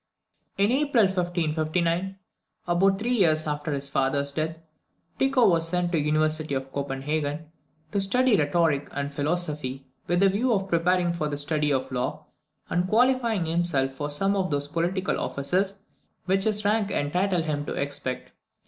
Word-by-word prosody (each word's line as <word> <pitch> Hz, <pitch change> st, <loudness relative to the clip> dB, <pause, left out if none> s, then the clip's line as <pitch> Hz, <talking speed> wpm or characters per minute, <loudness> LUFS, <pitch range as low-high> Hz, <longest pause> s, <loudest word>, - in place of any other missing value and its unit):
In 200 Hz, +3 st, +3 dB
April 275 Hz, -3 st, +3 dB
1559, 175 Hz, 0 st, 0 dB, 0.5 s
about 190 Hz, +3 st, +3 dB
three 235 Hz, +5 st, -1 dB
years 160 Hz, -8 st, +3 dB
after 150 Hz, 0 st, -3 dB
his 140 Hz, -1 st, -3 dB
father's 140 Hz, +1 st, 0 dB
death, 160 Hz, +2 st, -2 dB, 0.6 s
Tycho 270 Hz, -2 st, +4 dB
was 165 Hz, -2 st, +3 dB
sent 175 Hz, 0 st, 0 dB
to 165 Hz, -, +1 dB
the -, -, 0 dB
University 155 Hz, -1 st, 0 dB
of 135 Hz, 0 st, -4 dB
Copenhagen, 145 Hz, +3 st, -3 dB, 0.4 s
to 200 Hz, -, 0 dB
study 250 Hz, +4 st, +3 dB
rhetoric 150 Hz, -2 st, +1 dB
and 140 Hz, 0 st, -3 dB
philosophy, 145 Hz, -3 st, -2 dB, 0.2 s
with 175 Hz, +1 st, +2 dB
the 195 Hz, -, +6 dB
view 230 Hz, +6 st, +1 dB
of 195 Hz, -2 st, -1 dB
preparing 175 Hz, +1 st, +2 dB
for 155 Hz, -3 st, -2 dB
the 145 Hz, -, -3 dB
study 150 Hz, 0 st, 0 dB
of 130 Hz, -1 st, 0 dB
the -, -, -9 dB
law, 125 Hz, -, -3 dB, 0.4 s
and 175 Hz, +2 st, 0 dB
qualifying 235 Hz, -3 st, +2 dB
himself 160 Hz, -5 st, 0 dB
for 145 Hz, +2 st, -3 dB
some 195 Hz, +7 st, +1 dB
of 190 Hz, -2 st, 0 dB
those 145 Hz, -1 st, -1 dB
political 175 Hz, +4 st, -1 dB
offices 185 Hz, +8 st, -1 dB, 0.5 s
which 190 Hz, +1 st, +1 dB
his 210 Hz, -1 st, 0 dB
rank 210 Hz, 0 st, +2 dB
entitled 180 Hz, +1 st, 0 dB
him 145 Hz, -2 st, -2 dB
to -, -, -3 dB
expect. 140 Hz, -2 st, -4 dB
165 Hz, 160 wpm, -26 LUFS, 145-195 Hz, 0.6 s, the